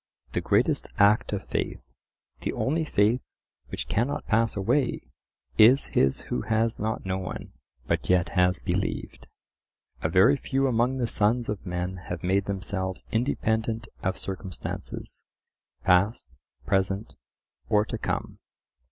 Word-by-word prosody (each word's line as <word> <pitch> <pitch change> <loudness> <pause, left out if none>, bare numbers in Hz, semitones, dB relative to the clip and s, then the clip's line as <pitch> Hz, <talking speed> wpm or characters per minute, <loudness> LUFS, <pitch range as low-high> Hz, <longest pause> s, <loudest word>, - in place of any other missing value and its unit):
The - - 0
greatest - - +2
act 105 +2 +4
of 100 -2 -3
faith, - - -4 0.5
the - - -2
only 160 +4 0
faith 115 -1 +2 0.4
which - - -5
cannot 120 +7 0
pass 115 0 +2
away, 120 +7 +1 0.6
is 120 +6 +7
his 65 0 +3
who 60 - -3
has 115 - 0
not 110 -1 -2
known, 95 -1 -4 0.3
but - - -1
yet 90 -2 +3
has 90 -1 +3
believed. 60 - -3 0.7
A 80 - 0
very 95 - +5
few 135 0 0
among 125 +1 +2
the 125 - +1
sons 115 +2 +1
of 105 -2 -3
men 90 +1 -3
have 90 -2 -4
made 95 +2 +2
themselves 95 -1 -3
independent 110 -2 0
of 95 0 -1
circumstances, 95 -2 -6 0.6
past, 90 - +2 0.3
present, 95 +1 0 0.6
or 105 0 +4
to - - -5
come. - - -3
105 Hz, 130 wpm, -27 LUFS, 95-115 Hz, 0.7 s, is